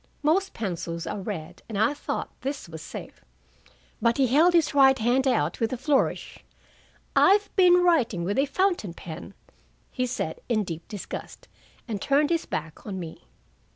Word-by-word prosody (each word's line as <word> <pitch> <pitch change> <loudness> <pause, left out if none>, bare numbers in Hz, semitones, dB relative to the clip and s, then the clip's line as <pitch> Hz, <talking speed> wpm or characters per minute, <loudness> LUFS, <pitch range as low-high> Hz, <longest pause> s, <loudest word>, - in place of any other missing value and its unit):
Most 375 +6 +2
pencils 170 -5 -4
are 205 +4 -4
red, 185 -6 -6
and 215 - -4
I 220 +7 +3
thought 290 - -4
this 275 -5 -4
was 160 -1 -9
safe. - - -9 0.8
But 230 +1 +2
he 270 - +4
held 305 +8 +4
his 330 -3 +3
right 265 -1 +6
hand 250 +3 +2
out 165 - +1
with 225 -1 0
a 255 - -2
flourish. 275 +2 0 0.7
"I've 405 +2 +4
been 360 -2 +6
writing 245 - +2
with 200 +8 0
a 280 - +3
fountain 345 - 0
pen," 175 +4 -9 0.6
he 255 -1 -1
said 235 -10 -4
in 215 -3 +2
deep 165 -3 -7
disgust, 205 -4 -8 0.4
and 210 -4 -4
turned 290 +3 +2
his 335 -1 0
back 155 0 -5
on 190 -2 -4
me. 165 - -8
240 Hz, 165 wpm, -26 LUFS, 185-290 Hz, 0.8 s, right